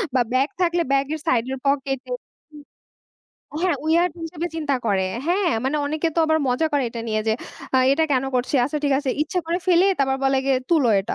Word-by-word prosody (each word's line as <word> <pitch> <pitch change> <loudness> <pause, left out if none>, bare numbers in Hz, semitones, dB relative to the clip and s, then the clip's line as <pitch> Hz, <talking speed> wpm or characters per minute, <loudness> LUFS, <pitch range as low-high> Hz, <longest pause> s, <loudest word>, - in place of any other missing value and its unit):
বা 250 - +4
ব্যাগ 265 +3 +2
থাকলে 345 -1 +2
ব্যাগের 275 +3 0
সাইডের 255 +2 +1
পকেটে 270 -2 -1 0.4
হু। 295 -1 -16 0.8
হ্যাঁ, 360 -5 +2
weird 335 +1 +3
হিসেবে 330 +1 -4
চিন্তা 295 -3 0
করে। 195 -3 +1 0.2
হ্যাঁ, 365 +2 +2
মানে 270 +3 0
অনেকে 310 +3 -1
তো - - +2
আবার 315 0 +3
মজা 250 +6 +1
করে 285 -1 +2
এটা 230 - -6
নিয়ে 215 0 0
যে, - - +3 0.4
আ - - +6
এটা 320 +3 +2
কেন 260 0 +2
করছি? 250 +3 -2
আচ্ছা 295 +4 -2
ঠিক 285 - +2
আছে 280 -2 -1
ইচ্ছা 340 +5 -2
করে 340 +1 0
ফেলে 360 +1 +5
তারপর 265 -1 +1
বলে 270 0 +3
গিয়ে, 270 -1 +2
"তুলো 305 -8 +4
এটা।" 195 - -4
285 Hz, 200 wpm, -22 LUFS, 265-325 Hz, 0.8 s, আ